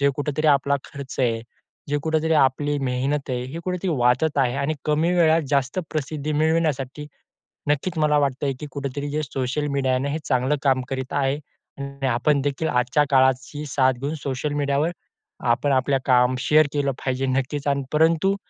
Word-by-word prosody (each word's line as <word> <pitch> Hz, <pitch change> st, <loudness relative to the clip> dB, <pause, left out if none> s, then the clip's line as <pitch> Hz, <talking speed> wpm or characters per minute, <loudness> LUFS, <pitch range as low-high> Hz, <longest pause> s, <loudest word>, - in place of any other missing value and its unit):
जे 140 Hz, 0 st, +4 dB
कुठेतरी 150 Hz, +1 st, -1 dB
आपला 140 Hz, -1 st, +3 dB
खर्च 140 Hz, -1 st, -9 dB
आहे, 115 Hz, -2 st, +1 dB, 0.5 s
जे 145 Hz, +1 st, +1 dB
कुठेतरी 160 Hz, 0 st, +1 dB
आपली 145 Hz, +2 st, +1 dB
मेहनत 135 Hz, +2 st, -1 dB
आहे, 125 Hz, -1 st, -1 dB
हे 145 Hz, +6 st, -7 dB
कुठेतरी 180 Hz, 0 st, -2 dB
वाचत 125 Hz, +5 st, +2 dB
आहे 130 Hz, -1 st, +2 dB
आणि 140 Hz, +3 st, -1 dB
कमी 155 Hz, +3 st, +2 dB
वेळात 165 Hz, -1 st, +4 dB
जास्त 140 Hz, +3 st, +1 dB
प्रसिद्धी 155 Hz, 0 st, -3 dB
मिळविण्यासाठी 150 Hz, -3 st, 0 dB, 0.6 s
नक्कीच 160 Hz, +4 st, 0 dB
मला 150 Hz, -1 st, +3 dB
वाटतंय, 140 Hz, 0 st, 0 dB
की 150 Hz, -, -6 dB
कुठेतरी 140 Hz, +1 st, -4 dB
जे 155 Hz, +1 st, -1 dB
सोशल 135 Hz, +2 st, -2 dB
मीडिया 135 Hz, -2 st, +1 dB
आहे 130 Hz, -, +1 dB
ना, 140 Hz, -, -1 dB
हे 155 Hz, +3 st, -2 dB
चांगलं 130 Hz, +2 st, +1 dB
काम 130 Hz, -2 st, +3 dB
करीत 130 Hz, 0 st, -4 dB
आहे 140 Hz, 0 st, 0 dB, 0.4 s
आणि 140 Hz, -1 st, -4 dB
आपण 130 Hz, +4 st, +2 dB
देखील 145 Hz, +3 st, -1 dB
आजच्या 125 Hz, +4 st, +2 dB
काळाची 130 Hz, +3 st, +2 dB
साथ 130 Hz, -1 st, +2 dB
घेऊन 145 Hz, +3 st, -2 dB
सोशल 140 Hz, +2 st, -2 dB
मीडियावर 145 Hz, +3 st, 0 dB, 0.6 s
आपण 135 Hz, +4 st, +1 dB
आपलं 135 Hz, +1 st, +2 dB
काम 125 Hz, 0 st, +4 dB
शेअर 150 Hz, +2 st, +4 dB
केलं 140 Hz, -1 st, +1 dB
पाहिजे 130 Hz, 0 st, -1 dB
नक्कीच 135 Hz, +2 st, -1 dB
आणि 140 Hz, -1 st, +1 dB
परंतु 165 Hz, +5 st, +3 dB
140 Hz, 170 wpm, -23 LUFS, 130-150 Hz, 0.6 s, जे